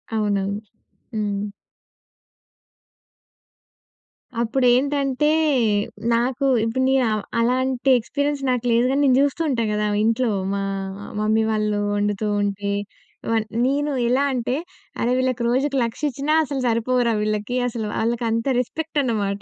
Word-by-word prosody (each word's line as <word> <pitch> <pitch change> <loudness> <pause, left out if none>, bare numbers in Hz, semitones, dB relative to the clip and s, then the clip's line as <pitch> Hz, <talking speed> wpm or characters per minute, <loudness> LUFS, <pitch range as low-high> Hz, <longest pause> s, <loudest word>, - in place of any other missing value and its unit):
అవునవును. 205 -1 0 0.6
హ్మ్. 205 -1 -1 3.0
అప్పుడేంటంటే, 270 +4 +2 0.8
నాకు 245 +4 0 0.2
ఇప్పుడు 230 +3 -1
నేను 265 -1 +3
అ - - +1 0.2
అలాంటి 255 +2 +1
ఎక్స్‌పీరియన్స్ 285 +4 -2
నాకు 250 -1 0
లేదు 235 +2 +3
గాని 280 - +1
నేను 260 -2 +4
జూస్తూ 285 +3 +1
ఉంటా 235 -3 0
గదా! 210 0 0 0.2
ఇంట్లో. 230 +2 +2 0.2
మా 200 - -1 0.6
మమ్మీ 220 +1 +2
వాళ్ళు 215 -1 0 0.2
వండుతూ 205 +1 -1
ఉంటే 200 0 -2 0.6
వ - - +2 0.3
నేను 285 +2 0 0.2
ఎలా 255 +4 +2
అంటే, 250 +1 -1 0.5
అరె! 240 - +1
వీళ్ళకి 255 -2 0
రోజుకి 275 +3 +1
లక్షిచ్చినా 280 +4 -2
అసలు 275 -2 -3
సరిపోవురా 235 +1 +1
వీళ్ళకి 215 +3 -1
అసలు. 225 -3 -3
ఆళ్ళకి 235 +1 0
అంత 230 0 -1
రెస్పెక్టనమాట. 240 -9 -1
240 Hz, 115 wpm, -22 LUFS, 215-265 Hz, 3.0 s, నేను